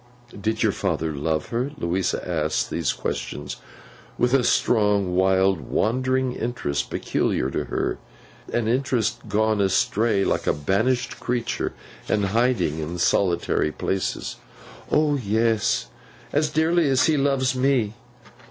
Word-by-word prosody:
'Did 110 +2 -1
your - - +3
father 80 -1 -1
love 80 +2 -1
her?' 120 +4 -1
Louisa 90 +2 -1
asked 80 -3 -1
these - - 0
questions 75 0 -4 0.6
with 125 +1 +2
a 135 -2 +4
strong, 105 -5 +2
wild, 95 0 +3
wandering 130 +2 0
interest 95 -14 -2
peculiar 65 - -1
to - - -2
her; - - -2 0.5
an 120 -2 0
interest 120 -2 +1
gone 110 0 +2
astray 100 +2 +2
like - - -1
a - - +4
banished 115 - 0
creature, 120 -1 -2 0.4
and 105 -2 +2
hiding 115 -10 +1
in 80 +3 -4
solitary 85 -3 +1
places. 95 +4 -3 0.5
'O 150 -1 +3
yes! 110 -1 +1 0.4
As 150 +1 +2
dearly 160 +1 +2
as 130 -1 +4
he 160 - +3
loves 135 -2 +1
me. 125 -5 +1
110 Hz, 125 wpm, -24 LUFS, 95-130 Hz, 0.6 s, a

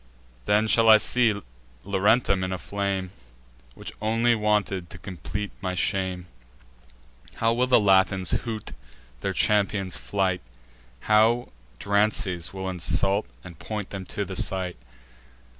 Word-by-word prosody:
Then, 105 +1 +3
shall 115 +1 +4
I 110 - +10
see 110 -2 +2 0.4
Laurentum 100 0 +2
in 95 - -2
a 95 - -2
flame, 95 -1 -3 0.6
Which - - -8
only 115 +2 +2
wanted, 105 -5 0
to 90 - -9
complete 95 +3 -6
my 95 -1 -3
shame? 95 -1 -1 1.1
How 115 0 +1
will 125 +2 +1
the 125 - +5
Latins 95 -3 +3
hoot 110 -3 -3 0.5
their - - -2
champion's 100 -3 +1
flight! 95 -2 -1 0.6
How 110 +3 +3 0.3
Drances 100 - 0
will 95 0 -5
insult 95 +3 0 0.2
and 85 -3 -12
point 105 -3 -5
them 95 -1 -6
to 100 - -3
the 95 0 -7
sight! 90 -1 -1
100 Hz, 125 wpm, -25 LUFS, 95-110 Hz, 1.1 s, I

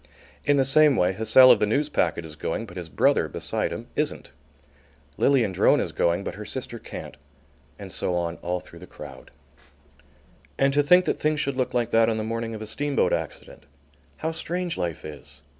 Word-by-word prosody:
In 145 0 +3
the 135 - +3
same 150 +1 +6
way, 90 -2 +2
Hussell 110 +5 +6
of 120 - +5
the 105 - +1
Newspacket 105 - 0
is 75 -1 -10
going, 80 +8 -4
but 90 - -13
his 90 -3 -7
brother, 70 - +2
beside - - -3
him, - - -6
isn't. - - -3 0.8
Lilian 125 -8 +2
Drone 95 - +3
is - - -2
going, 85 +3 0
but - - -5
her 105 - -8
sister 120 +1 -6
can't; 75 - -9 0.6
and 100 -2 -9
so 90 - -1
on 85 -1 -2
all 90 +1 -3
through - - -15
the - - -12
crowd. - - -12 1.3
And 135 0 +2
to 145 - +4
think 180 +5 +5
that - - -1
things 155 0 0
should 140 -1 -1
look 130 -1 -2
like 120 -1 0
that 115 0 +4
on 110 - -1
the 110 - -2
morning 115 0 -4
of 110 - -7
a - - -6
steamboat 145 +6 0
accident. - - -6 0.5
How 160 - -2
strange 175 +1 -3
life 85 -3 -4
is! 75 -2 -10
115 Hz, 195 wpm, -25 LUFS, 90-140 Hz, 1.3 s, same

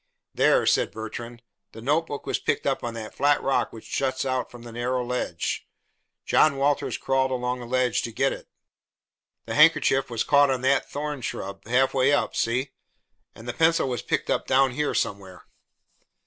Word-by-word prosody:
"There," - - +3
said - - +2
Bertrand, 115 +2 -8 0.3
"the 110 - -10
notebook 145 +3 -1
was - - -1
picked - - -1
up - - 0
on 115 -1 -4
that 110 -1 -7
flat 145 0 +2
rock 135 - +1
which 110 - -12
juts 130 -1 -1
out 130 -1 -1
from 120 -1 -12
that 120 - -9
narrow 125 +2 -2
ledge. 120 -9 -3 0.6
John 155 -3 +4
Walters 140 +1 0
crawled 135 0 +1
along 125 -1 -2
the 120 - -8
ledge 130 0 +1
to 115 - -5
get 135 +5 +1
it. - - -10 1.0
The - - -5
handkerchief 140 -4 +4
was 115 -2 -1
caught 145 -1 +4
on 130 -2 0
that 135 +2 +1
thorn 145 -1 -4
shrub, 100 -3 -6
halfway 130 +2 +3
up, 145 - +1
see? 130 +4 0 0.6
And 115 - -12
the 120 - -3
pencil 165 -1 +3
was 125 -3 -2
picked - - -2
up - - -1
down 135 0 +3
here, 150 +4 -1
somewhere." 95 -2 -3
130 Hz, 175 wpm, -25 LUFS, 120-135 Hz, 1.0 s, John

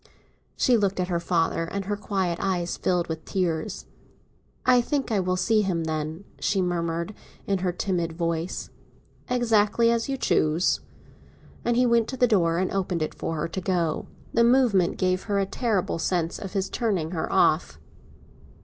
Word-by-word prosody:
She 245 -2 +4
looked 200 -3 0
at 180 0 -1
her 170 -1 0
father, 165 -1 0
and 195 +3 -4
her 205 +1 -1
quiet 190 -4 -2
eyes 180 -3 -1
filled 180 -2 0
with 160 -1 -5
tears. 170 -4 -2 0.8
"I 250 -1 +6
think 275 0 -2
I 210 - +2
will 185 0 0
see 215 +3 +2
him, 180 -5 -1
then," 160 +2 -3 0.2
she 200 - +1
murmured, 170 +1 -1 0.3
in 195 -1 0
her 180 0 0
timid 175 -2 -2
voice. 170 +1 -3 0.6
"Exactly 230 -2 +3
as 235 +2 0
you 270 - -1
choose!" 160 -7 +2 0.8
And 240 0 +1
he 250 - +4
went 235 -2 +3
to 260 - -5
the 250 - +5
door 175 -8 +2
and 185 +1 0
opened 180 -4 -1
it 155 - -3
for 165 - -4
her 155 - -1
to 190 - -4
go 185 +1 0
out. 165 -3 0 0.3
The 235 - +4
movement 235 -7 +3
gave 185 0 0
her 205 -2 0
a 195 - +2
terrible 200 -4 -1
sense 170 -1 -1
of 195 -2 -7
his 195 -2 0
turning 190 -9 -1
her 165 -3 -3
off. - - +2
185 Hz, 175 wpm, -25 LUFS, 170-215 Hz, 0.8 s, I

